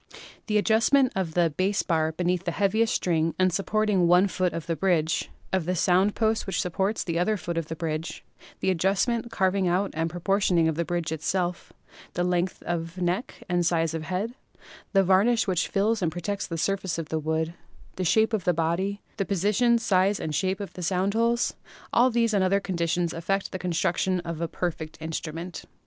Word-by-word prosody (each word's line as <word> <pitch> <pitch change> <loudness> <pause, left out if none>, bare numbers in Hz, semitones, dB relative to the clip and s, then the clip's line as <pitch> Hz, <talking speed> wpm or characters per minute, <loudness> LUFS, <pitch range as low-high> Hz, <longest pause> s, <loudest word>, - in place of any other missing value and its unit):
The 210 -2 +2
adjustment 235 +5 +3
of 180 -4 -2
the 170 -2 +3
bass 190 +6 0
bar 160 -2 +1
beneath 180 +2 -1
the - - 0
heaviest 220 +3 +2
string 165 -2 0
and 185 -1 +2
supporting 200 -1 +1
one 180 +3 +5
foot 185 -1 0
of 165 - -5
the 165 - -1
bridge; 160 -1 +1 0.2
of 190 -4 +1
the 180 +2 0
sound 185 +4 +3
post 220 -1 0
which 190 - -1
supports 190 +4 -1
the 170 -1 -1
other 210 +4 +1
foot 170 -2 -4
of 165 -2 -2
the 160 - -5
bridge; 160 0 -4 0.4
the 190 - +2
adjustment, 200 +7 +1
carving 190 -3 +1
out 185 +3 +1
and 165 +1 -1
pro 175 +2 -7
portioning 185 -3 +2
of 160 - +1
the 170 +3 -1
bridge 170 -2 -2
itself; 175 +3 -2 0.4
the 175 - +1
length 180 0 -1
of 170 +1 -3
neck 180 +6 -2
and 175 -2 +1
size 165 -2 +1
of 160 - -3
head; 195 +7 -2 0.6
the 195 -1 +4
varnish 200 +6 +3
which 180 -3 0
fills 210 +2 +1
and 170 -3 +1
protects 200 +5 -3
the 165 - -4
surface 190 +1 -1
of 165 -2 -5
the 160 - -1
wood; 160 +1 -1 0.4
the 185 - -2
shape 220 +6 +3
of 210 -4 0
the 180 -1 +2
body; 175 +5 -1
the 195 - +1
position, 210 +5 +2
size 195 -2 +2
and 155 - -3
shape 190 +4 0
of 200 - -6
the 180 - -8
sound 185 +3 0
holes 235 +2 +1 0.2
— - - -21
all 245 +2 +5
these 230 -2 +1
and 200 -2 +3
other 195 +2 +3
conditions 170 -3 -1
affect 195 +4 -2
the 185 - -4
construction 180 +1 0
of 165 -1 -5
a 170 - 0
perfect 160 -2 -4
instrument. 165 +2 -5
180 Hz, 200 wpm, -26 LUFS, 165-200 Hz, 0.6 s, one